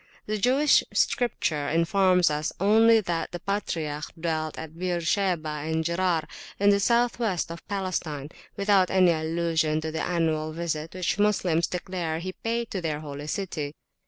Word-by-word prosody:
The 215 Hz, 0 st, -2 dB
Jewish 270 Hz, +7 st, +4 dB
Scripture 160 Hz, -, 0 dB
informs 180 Hz, +1 st, +3 dB
us 150 Hz, +1 st, -1 dB
only 220 Hz, +3 st, +5 dB
that 170 Hz, -4 st, -2 dB
the 175 Hz, -, -5 dB
patriarch 160 Hz, -7 st, -3 dB
dwelt 160 Hz, -2 st, -2 dB
at 160 Hz, 0 st, -8 dB
Beersheba 175 Hz, -1 st, 0 dB
and 155 Hz, +2 st, -2 dB
Gerar, 170 Hz, -2 st, 0 dB, 0.3 s
in 200 Hz, +1 st, +5 dB
the 200 Hz, -, +3 dB
south 235 Hz, +3 st, +2 dB
west 190 Hz, -8 st, -1 dB
of 170 Hz, -, -9 dB
Palestine, 175 Hz, -7 st, -3 dB, 0.3 s
without 200 Hz, -2 st, +3 dB
any 185 Hz, -2 st, +5 dB
allusion 160 Hz, -1 st, 0 dB
to 160 Hz, 0 st, -3 dB
the 160 Hz, -, -3 dB
annual 160 Hz, -3 st, 0 dB
visit 160 Hz, -1 st, -4 dB
which 185 Hz, +2 st, -1 dB
Moslems 185 Hz, -5 st, +2 dB
declare 180 Hz, -3 st, -3 dB
he 185 Hz, +3 st, -4 dB
paid 230 Hz, +3 st, -3 dB
to 190 Hz, -, -3 dB
their 155 Hz, -3 st, -2 dB
Holy 145 Hz, -1 st, -7 dB
City. 155 Hz, -5 st, -3 dB
170 Hz, 155 wpm, -26 LUFS, 160-195 Hz, 0.3 s, only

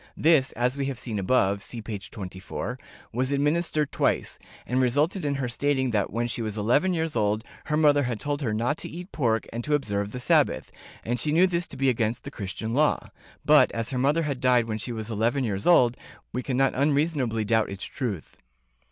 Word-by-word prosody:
This, 155 Hz, -4 st, +4 dB
as 125 Hz, +3 st, 0 dB
we 140 Hz, -1 st, -1 dB
have 135 Hz, -3 st, -3 dB
seen 115 Hz, -4 st, -3 dB
above 100 Hz, -1 st, +2 dB
(p. 110 Hz, -3 st, -5 dB
24) 95 Hz, +5 st, -6 dB, 0.3 s
was 130 Hz, +3 st, 0 dB
administered 150 Hz, +1 st, +1 dB
twice, -, -, 0 dB, 0.3 s
and 130 Hz, +2 st, +1 dB
resulted 145 Hz, +9 st, +1 dB
in 145 Hz, -1 st, 0 dB
her 135 Hz, -2 st, -2 dB
stating 130 Hz, +1 st, 0 dB
that 105 Hz, -3 st, 0 dB
when 120 Hz, +3 st, -1 dB
she 120 Hz, -, -3 dB
was 110 Hz, -1 st, -3 dB
eleven 145 Hz, -, +2 dB
years 160 Hz, -3 st, -2 dB
old 105 Hz, 0 st, +1 dB, 0.2 s
her 150 Hz, -, 0 dB
mother 145 Hz, -2 st, +5 dB
had 120 Hz, -5 st, -2 dB
told 145 Hz, 0 st, -2 dB
her 120 Hz, -6 st, -1 dB
not 120 Hz, +8 st, 0 dB
to -, -, -6 dB
eat 180 Hz, +4 st, -8 dB
pork 115 Hz, -6 st, 0 dB
and 120 Hz, +1 st, -3 dB
to 150 Hz, +3 st, +2 dB
observe 100 Hz, -7 st, -2 dB
the 125 Hz, -, -5 dB
Sabbath, 125 Hz, -, +2 dB, 0.3 s
and 120 Hz, +1 st, -1 dB
she 150 Hz, -, 0 dB
knew 170 Hz, +4 st, +5 dB
this 175 Hz, -2 st, -1 dB
to -, -, -9 dB
be 135 Hz, 0 st, +1 dB
against 115 Hz, -2 st, 0 dB
the -, -, -7 dB
Christian 105 Hz, +3 st, -5 dB
Law 150 Hz, +3 st, +1 dB
— -, -, -26 dB
but, -, -, +6 dB
as 115 Hz, +1 st, -3 dB
her 130 Hz, -, -1 dB
mother 145 Hz, +5 st, +2 dB
had 140 Hz, -4 st, -3 dB
died 125 Hz, -2 st, +3 dB
when 110 Hz, -1 st, -3 dB
she 110 Hz, -, -5 dB
was 110 Hz, -1 st, -5 dB
eleven 115 Hz, +6 st, +1 dB
years 100 Hz, -4 st, -2 dB
old, 125 Hz, -9 st, +5 dB, 0.4 s
we 125 Hz, -, -1 dB
can 130 Hz, -1 st, -2 dB
not 135 Hz, 0 st, +3 dB
unreasonably 140 Hz, -5 st, +1 dB
doubt 110 Hz, +1 st, +2 dB
its 100 Hz, 0 st, -6 dB
truth. 115 Hz, -, -5 dB
125 Hz, 215 wpm, -26 LUFS, 110-145 Hz, 0.4 s, but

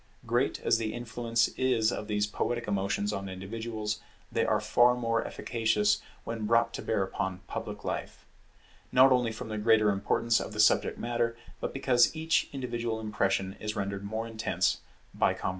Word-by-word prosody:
Great -, -, +1 dB
as 115 Hz, -, +3 dB
the 110 Hz, -1 st, -2 dB
influence 115 Hz, -1 st, 0 dB
is 120 Hz, -4 st, +1 dB
of 105 Hz, -, -4 dB
these 105 Hz, -1 st, +1 dB
poetic 120 Hz, +3 st, -2 dB
emotions 100 Hz, +1 st, 0 dB
on 100 Hz, -1 st, -4 dB
individuals, 105 Hz, +2 st, -4 dB, 0.3 s
they -, -, +1 dB
are -, -, +2 dB
far 120 Hz, +1 st, +4 dB
more 115 Hz, -2 st, 0 dB
efficacious 105 Hz, -3 st, +1 dB, 0.2 s
when 115 Hz, -2 st, -4 dB
brought 115 Hz, +1 st, +3 dB
to -, -, -4 dB
bear 105 Hz, -3 st, 0 dB
upon 95 Hz, -1 st, -3 dB
public -, -, -6 dB
life: -, -, -4 dB, 0.7 s
not 130 Hz, +1 st, +7 dB
only 125 Hz, -3 st, +3 dB
from 110 Hz, 0 st, -7 dB
the 110 Hz, -1 st, -3 dB
greater 110 Hz, -1 st, +4 dB
importance 115 Hz, +3 st, +1 dB
of -, -, -5 dB
the 105 Hz, -, -6 dB
subject 105 Hz, -, +4 dB
matter, 120 Hz, -1 st, -1 dB, 0.2 s
but -, -, -3 dB
because 130 Hz, 0 st, +3 dB
each 160 Hz, +1 st, +1 dB
individual 120 Hz, -4 st, -3 dB
impression 100 Hz, -3 st, 0 dB
is 105 Hz, +1 st, -4 dB
rendered 100 Hz, -1 st, -3 dB
more 110 Hz, +3 st, -3 dB
intense 115 Hz, -1 st, 0 dB, 0.3 s
by -, -, +2 dB
combination. -, -, -2 dB
110 Hz, 170 wpm, -29 LUFS, 105-120 Hz, 0.7 s, not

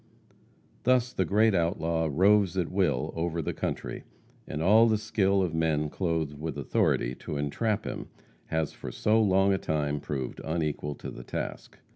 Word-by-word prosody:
Thus 125 Hz, 0 st, +2 dB
the 95 Hz, -, +1 dB
great 105 Hz, +5 st, +3 dB
outlaw 85 Hz, -2 st, 0 dB
roves 95 Hz, +3 st, +4 dB
at 90 Hz, -3 st, 0 dB
will 90 Hz, -10 st, 0 dB
over 85 Hz, 0 st, -2 dB
the 80 Hz, -, -2 dB
country, -, -, -4 dB, 0.4 s
and 75 Hz, -, -4 dB
all 105 Hz, +7 st, +6 dB
the 110 Hz, -1 st, +3 dB
skill 100 Hz, -2 st, +1 dB
of 85 Hz, -3 st, -2 dB
men 80 Hz, -2 st, 0 dB
clothed 80 Hz, -5 st, -2 dB
with 80 Hz, -1 st, -4 dB
authority 65 Hz, -3 st, +1 dB
to 75 Hz, -, -5 dB
entrap 105 Hz, +10 st, -1 dB
him -, -, -5 dB, 0.4 s
has 80 Hz, -1 st, -1 dB
for -, -, -7 dB
so 110 Hz, +1 st, +2 dB
long 95 Hz, -1 st, +4 dB
a 95 Hz, -, 0 dB
time 75 Hz, -1 st, -1 dB
proved 65 Hz, -4 st, -4 dB
unequal 75 Hz, -2 st, -2 dB
to -, -, -7 dB
the -, -, -9 dB
task. -, -, -6 dB
85 Hz, 165 wpm, -28 LUFS, 75-100 Hz, 0.4 s, all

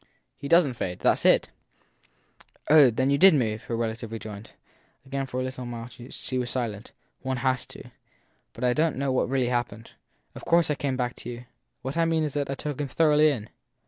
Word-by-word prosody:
He 140 Hz, -, -7 dB
doesn 165 Hz, -3 st, +5 dB
t 120 Hz, -, -11 dB
fade. 90 Hz, -1 st, -4 dB
That -, -, +5 dB
s -, -, -3 dB
it. -, -, +4 dB, 1.2 s
9 155 Hz, -, +8 dB
Oh, 140 Hz, -4 st, +8 dB
then 130 Hz, +4 st, 0 dB
you 140 Hz, -, +2 dB
did 190 Hz, -2 st, +8 dB
move! 110 Hz, -4 st, -1 dB
her 115 Hz, -, -3 dB
relative 115 Hz, 0 st, -3 dB
rejoined. 110 Hz, -1 st, -8 dB, 0.5 s
Again 135 Hz, 0 st, -3 dB
for 130 Hz, -1 st, -4 dB
a -, -, -1 dB
little 120 Hz, -3 st, -6 dB, 0.2 s
she 130 Hz, -, -4 dB
was 125 Hz, -1 st, -2 dB
silent. 115 Hz, -4 st, -3 dB, 0.3 s
One 130 Hz, -1 st, -2 dB
has 130 Hz, 0 st, 0 dB
to. -, -, -12 dB, 0.6 s
But 115 Hz, -, -8 dB
I 125 Hz, -1 st, +3 dB
don 160 Hz, +3 st, +1 dB
t -, -, -10 dB
know 140 Hz, 0 st, 0 dB
what 130 Hz, -, +1 dB
really 130 Hz, -2 st, +1 dB
happened. 120 Hz, -3 st, -3 dB, 0.4 s
Of -, -, -10 dB
course 170 Hz, -2 st, +3 dB
I -, -, +3 dB
came 140 Hz, -2 st, -2 dB
back 125 Hz, -1 st, -2 dB
to -, -, -7 dB
you. 120 Hz, 0 st, -8 dB, 0.4 s
What 135 Hz, +5 st, -4 dB
I 165 Hz, -, +3 dB
mean 165 Hz, -1 st, +1 dB
is 150 Hz, -3 st, -2 dB
that 145 Hz, -1 st, -2 dB
I 135 Hz, -, -2 dB
took 145 Hz, +1 st, -4 dB
him 145 Hz, -, -2 dB
thoroughly 155 Hz, +1 st, +4 dB
in. 115 Hz, -7 st, -4 dB
130 Hz, 220 wpm, -26 LUFS, 120-145 Hz, 1.2 s, 9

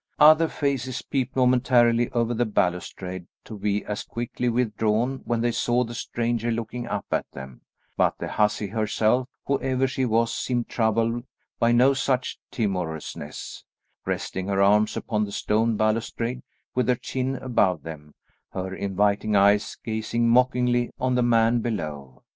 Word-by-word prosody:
Other 155 Hz, +2 st, +7 dB
faces 135 Hz, -4 st, -2 dB
peeped 130 Hz, -2 st, -2 dB
momentarily 125 Hz, -2 st, +3 dB
over 120 Hz, 0 st, 0 dB
the 120 Hz, 0 st, 0 dB
balustrade 90 Hz, -2 st, -2 dB, 0.2 s
to 110 Hz, -, -9 dB
be 105 Hz, 0 st, -1 dB
as 105 Hz, 0 st, -3 dB
quickly 120 Hz, +1 st, -3 dB
withdrawn 115 Hz, +2 st, 0 dB
when 120 Hz, -1 st, 0 dB
they 120 Hz, 0 st, +1 dB
saw 120 Hz, +1 st, +1 dB
the 120 Hz, 0 st, -7 dB
stranger 120 Hz, 0 st, -2 dB
looking 115 Hz, +1 st, -3 dB
up -, -, -3 dB
at -, -, -1 dB
them; 65 Hz, -2 st, -10 dB, 0.4 s
but -, -, +2 dB
the -, -, -5 dB
hussy 105 Hz, 0 st, +1 dB
herself, 110 Hz, +4 st, 0 dB, 0.2 s
whoever 135 Hz, -1 st, +1 dB
she 130 Hz, 0 st, -1 dB
was, 115 Hz, 0 st, +1 dB
seemed 120 Hz, -2 st, -1 dB
troubled 115 Hz, +1 st, 0 dB, 0.4 s
by 115 Hz, -, +3 dB
no 125 Hz, +3 st, +5 dB
such 130 Hz, -1 st, -1 dB
timorousness, 85 Hz, -, -4 dB, 0.4 s
resting 95 Hz, 0 st, -3 dB
her 100 Hz, -1 st, 0 dB
arms 105 Hz, +2 st, +3 dB
upon 105 Hz, -2 st, -1 dB
the 100 Hz, -, -4 dB
stone 110 Hz, +2 st, +1 dB
balustrade, 115 Hz, +3 st, -1 dB, 0.3 s
with 125 Hz, -, 0 dB
her 125 Hz, -, +4 dB
chin 130 Hz, +2 st, -3 dB
above 100 Hz, -, +1 dB
them, 75 Hz, -2 st, -9 dB, 0.4 s
her 95 Hz, 0 st, -4 dB
inviting 100 Hz, +2 st, 0 dB
eyes 100 Hz, +1 st, +3 dB
gazing 115 Hz, +1 st, -1 dB
mockingly 125 Hz, 0 st, +3 dB
on 130 Hz, 0 st, +1 dB
the 125 Hz, -, +2 dB
man 115 Hz, 0 st, +3 dB
below. 75 Hz, -, -5 dB
115 Hz, 150 wpm, -25 LUFS, 105-125 Hz, 0.4 s, Other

